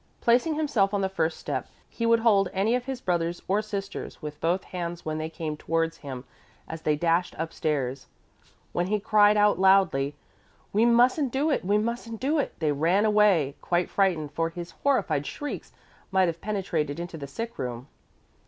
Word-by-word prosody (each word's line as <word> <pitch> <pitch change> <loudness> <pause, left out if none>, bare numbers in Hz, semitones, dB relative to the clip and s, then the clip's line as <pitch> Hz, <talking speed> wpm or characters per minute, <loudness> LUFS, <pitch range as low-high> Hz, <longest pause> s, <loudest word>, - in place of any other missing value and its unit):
Placing 245 +7 +3
himself 230 -10 +1
on 200 - 0
the 190 - 0
first 165 -3 -1
step, 140 -3 -4 0.2
he 230 - -2
would 230 0 +4
hold 200 -5 +4
any 200 +5 +1
of 250 0 0
his 265 -1 -4
brothers 175 -3 -1
or 200 +3 +2
sisters 200 -2 -6
with 150 -2 -8
both 175 +3 +1
hands 175 -1 -5
when 155 0 -2
they 155 0 -3
came 160 -2 -4
towards 165 +1 -1
him 130 -3 -7 0.4
as 160 0 -7
they 150 -1 +1
dashed 170 +3 +1
upstairs. 145 -5 -2 0.7
When 175 +1 0
he 210 +2 +1
cried 210 +1 +4
out 210 -2 +4
loudly, 185 -8 +4 0.6
"We 215 +3 +4
mustn't 245 +3 +4
do 285 +5 +1
it, - - 0
we 200 +3 +2
mustn't 230 0 -3
do 295 +4 +1
it," - - -2
they 155 -2 +1
ran 170 +8 +2
away 210 -9 +4
again, - - -13
quite 175 0 0
frightened, 170 -7 +1
for 165 +2 -1
his 170 0 -8
horrified 255 - +1
shrieks 290 - -6 0.4
might 190 -1 +3
have 170 0 -3
penetrated 175 -8 -2
into 175 -1 -6
the 140 - -6
sick 230 - -6
room. 125 0 -4
185 Hz, 185 wpm, -26 LUFS, 160-215 Hz, 0.7 s, would